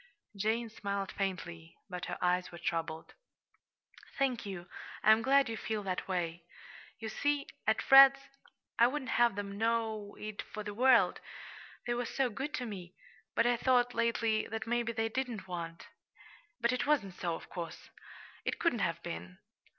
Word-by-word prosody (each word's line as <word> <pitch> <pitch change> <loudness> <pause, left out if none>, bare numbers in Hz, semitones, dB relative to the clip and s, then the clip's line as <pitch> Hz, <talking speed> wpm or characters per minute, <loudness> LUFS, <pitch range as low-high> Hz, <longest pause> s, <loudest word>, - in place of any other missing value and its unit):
Jane 220 +4 0
smiled 200 -2 -3
faintly, 175 -4 -4
but 180 -2 -5
her - - -4
eyes 180 0 +1
were 170 - -9
troubled. 165 -2 -3 1.0
"Thank 260 -6 0
you; 175 -3 -6 0.4
I'm 220 +1 +6
glad 275 +3 +4
you 230 - -3
feel 215 -1 -3
that 185 -2 -3
way. 175 -2 -2 0.5
You 225 - -6
see, 290 +5 0 0.2
at 220 0 +2
Fred's 275 0 +9 0.6
I 235 - +8
wouldn't 260 0 -3
have 240 -5 +4
them 200 0 -5
know 225 -2 -1
it 215 -1 -5
for 215 - -7
the 205 0 -5
world, 250 +2 +4 0.7
they 240 - 0
were 240 0 -1
so 265 -3 0
good 270 +8 -4
to 250 - -3
me 185 -5 -8 0.4
but 230 - +3
I 240 0 +3
thought, 245 -1 +3
lately, 230 -1 +1
that 220 0 -4
maybe 235 0 0
they 225 -1 0
didn't 225 -5 -3
want 170 -2 -6 0.7
But 235 +1 +2
it 250 - -1
wasn't 235 -11 +2
so, 170 -1 -2
of - - -10
course. 170 -2 -7 0.5
It - - -1
couldn't - - +1
have - - -1
been. 90 +2 -6
220 Hz, 165 wpm, -32 LUFS, 185-240 Hz, 1.0 s, Fred's